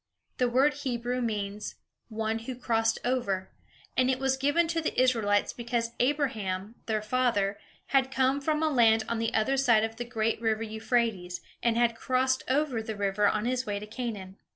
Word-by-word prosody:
The 250 Hz, -1 st, +3 dB
word 270 Hz, +5 st, +3 dB
Hebrew 250 Hz, -2 st, -2 dB
means, 210 Hz, -2 st, -3 dB, 0.3 s
"One 220 Hz, 0 st, -2 dB
who 245 Hz, +3 st, -6 dB
crossed 225 Hz, -2 st, +1 dB
over," 200 Hz, -7 st, -1 dB, 0.4 s
and 255 Hz, 0 st, +3 dB
it 260 Hz, -, +2 dB
was 265 Hz, 0 st, +1 dB
given 290 Hz, +5 st, +2 dB
to 330 Hz, 0 st, 0 dB
the 310 Hz, -, -1 dB
Israelites 225 Hz, -5 st, +2 dB
because 235 Hz, -1 st, -2 dB
Abraham, 225 Hz, -8 st, 0 dB
their 215 Hz, -2 st, 0 dB
father, 215 Hz, -4 st, +1 dB, 0.3 s
had 265 Hz, -1 st, +3 dB
come 265 Hz, +1 st, +1 dB
from 305 Hz, +2 st, 0 dB
a 315 Hz, -, +3 dB
land 225 Hz, -4 st, +4 dB
on 235 Hz, -, -1 dB
the 225 Hz, 0 st, 0 dB
other 265 Hz, +5 st, +2 dB
side 235 Hz, -5 st, +4 dB
of 225 Hz, 0 st, -3 dB
the 240 Hz, -, -3 dB
great 225 Hz, -2 st, -1 dB
river 225 Hz, -1 st, 0 dB
Euphrates, 220 Hz, -5 st, -1 dB, 0.2 s
and 235 Hz, -1 st, +1 dB
had 235 Hz, -1 st, +3 dB
crossed 260 Hz, +2 st, +1 dB
over 265 Hz, -4 st, +1 dB
the 220 Hz, 0 st, -5 dB
river 205 Hz, 0 st, +1 dB
on 215 Hz, +2 st, 0 dB
his 255 Hz, +1 st, -1 dB
way 205 Hz, -1 st, -1 dB
to 205 Hz, -, -6 dB
Canaan. 210 Hz, -4 st, -6 dB
235 Hz, 180 wpm, -28 LUFS, 215-255 Hz, 0.4 s, land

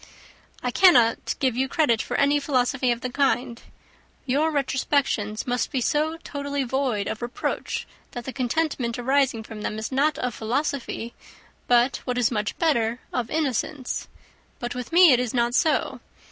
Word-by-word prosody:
"I 250 Hz, -, 0 dB
cannot 245 Hz, -10 st, +4 dB
give 260 Hz, -4 st, +1 dB
you 265 Hz, +2 st, +1 dB
credit 240 Hz, -9 st, +2 dB
for -, -, -3 dB
any 285 Hz, +1 st, +3 dB
philosophy 255 Hz, -2 st, +1 dB
of 235 Hz, 0 st, -2 dB
the 255 Hz, -, -3 dB
kind. 250 Hz, -3 st, 0 dB, 0.6 s
Your 285 Hz, +5 st, +2 dB
retrospections 270 Hz, -6 st, 0 dB
must 245 Hz, -1 st, -1 dB
be 270 Hz, -, 0 dB
so 305 Hz, +6 st, 0 dB
totally 285 Hz, -1 st, -3 dB
void 250 Hz, -5 st, -1 dB
of 220 Hz, -, -4 dB
reproach, 240 Hz, +1 st, -3 dB, 0.3 s
that 245 Hz, -2 st, -6 dB
the 265 Hz, -, -5 dB
contentment 255 Hz, -2 st, -1 dB
arising 260 Hz, -2 st, +1 dB
from 220 Hz, -1 st, -9 dB
them 210 Hz, -, -3 dB
is 220 Hz, +3 st, -4 dB
not 290 Hz, +3 st, +2 dB
of 250 Hz, -2 st, -2 dB
philosophy, 240 Hz, 0 st, -3 dB, 0.5 s
but, 245 Hz, +2 st, +3 dB
what 250 Hz, -1 st, -4 dB
is 245 Hz, -2 st, +2 dB
much 210 Hz, -3 st, -2 dB
better, 240 Hz, -7 st, +1 dB
of 240 Hz, -2 st, -2 dB
ignorance. 290 Hz, -2 st, -2 dB, 0.5 s
But 240 Hz, 0 st, -4 dB
with 250 Hz, -1 st, -6 dB
me, 345 Hz, -1 st, +7 dB
it 245 Hz, -, +3 dB
is 250 Hz, -1 st, -2 dB
not 240 Hz, 0 st, +1 dB
so. 310 Hz, +4 st, +1 dB
250 Hz, 160 wpm, -24 LUFS, 235-280 Hz, 0.6 s, me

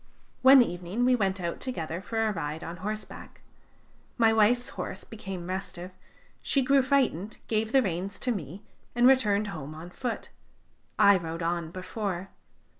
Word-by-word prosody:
"One 265 Hz, 0 st, +9 dB
evening 180 Hz, +4 st, -2 dB
we 255 Hz, 0 st, +5 dB
went 195 Hz, -4 st, 0 dB
out 170 Hz, -1 st, -3 dB
together 170 Hz, -9 st, -4 dB
for 225 Hz, +2 st, -1 dB
a -, -, +1 dB
ride 155 Hz, -2 st, -4 dB
on 170 Hz, +1 st, -6 dB
horseback. 215 Hz, +4 st, -7 dB, 0.8 s
My 225 Hz, -2 st, +4 dB
wife's 230 Hz, +3 st, +3 dB
horse -, -, -6 dB
became 195 Hz, -6 st, -7 dB
restive; 185 Hz, -1 st, -5 dB, 0.5 s
she 275 Hz, -, +1 dB
grew 275 Hz, +1 st, +4 dB
frightened, 250 Hz, -, 0 dB
gave 220 Hz, 0 st, 0 dB
the 270 Hz, 0 st, +5 dB
reins 190 Hz, +1 st, -3 dB
to 250 Hz, -, +1 dB
me, 190 Hz, -, -5 dB, 0.3 s
and 240 Hz, 0 st, +4 dB
returned 215 Hz, -6 st, +4 dB
home 155 Hz, -4 st, -7 dB
on 170 Hz, +3 st, -9 dB
foot. 245 Hz, +4 st, -5 dB, 0.7 s
I 200 Hz, -1 st, +7 dB
rode 165 Hz, -1 st, -5 dB
on 170 Hz, -1 st, -1 dB
before. 185 Hz, +1 st, -4 dB
200 Hz, 155 wpm, -28 LUFS, 175-235 Hz, 0.8 s, One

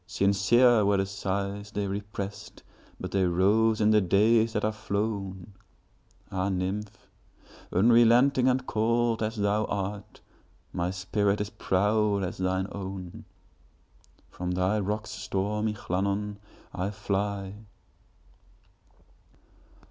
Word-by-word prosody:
Sincere 110 Hz, +5 st, +4 dB
were 100 Hz, 0 st, +3 dB
the 95 Hz, -, +1 dB
sighs 100 Hz, +1 st, -3 dB
they 105 Hz, -1 st, -3 dB
represt, 100 Hz, 0 st, -6 dB, 0.4 s
But -, -, -6 dB
they 95 Hz, -1 st, +1 dB
rose 105 Hz, +5 st, +3 dB
in 105 Hz, 0 st, +4 dB
the 105 Hz, -1 st, +5 dB
days 110 Hz, +5 st, +3 dB
that 105 Hz, -, 0 dB
are 110 Hz, -, +1 dB
flown! 100 Hz, -3 st, -4 dB, 0.8 s
Ah, 95 Hz, +1 st, -1 dB
nymph! 100 Hz, +3 st, -4 dB, 0.6 s
unrelenting 120 Hz, +6 st, +5 dB
and 130 Hz, 0 st, +1 dB
cold 115 Hz, +1 st, +1 dB
as 110 Hz, +1 st, -1 dB
thou 105 Hz, 0 st, +1 dB
art, 100 Hz, 0 st, -5 dB, 0.5 s
My 85 Hz, +1 st, -1 dB
spirit 100 Hz, +2 st, 0 dB
is 105 Hz, 0 st, -3 dB
proud 105 Hz, +1 st, +1 dB
as 90 Hz, -, -4 dB
thine 95 Hz, 0 st, 0 dB
own! 95 Hz, -2 st, -7 dB, 1.1 s
From 90 Hz, 0 st, -5 dB
thy 95 Hz, +4 st, +1 dB
rocks, 105 Hz, +2 st, -3 dB
stormy 105 Hz, +2 st, -2 dB
Llannon, 100 Hz, +2 st, -2 dB, 0.4 s
I 95 Hz, +2 st, -2 dB
fly. 100 Hz, -1 st, -3 dB
100 Hz, 110 wpm, -27 LUFS, 95-110 Hz, 1.1 s, the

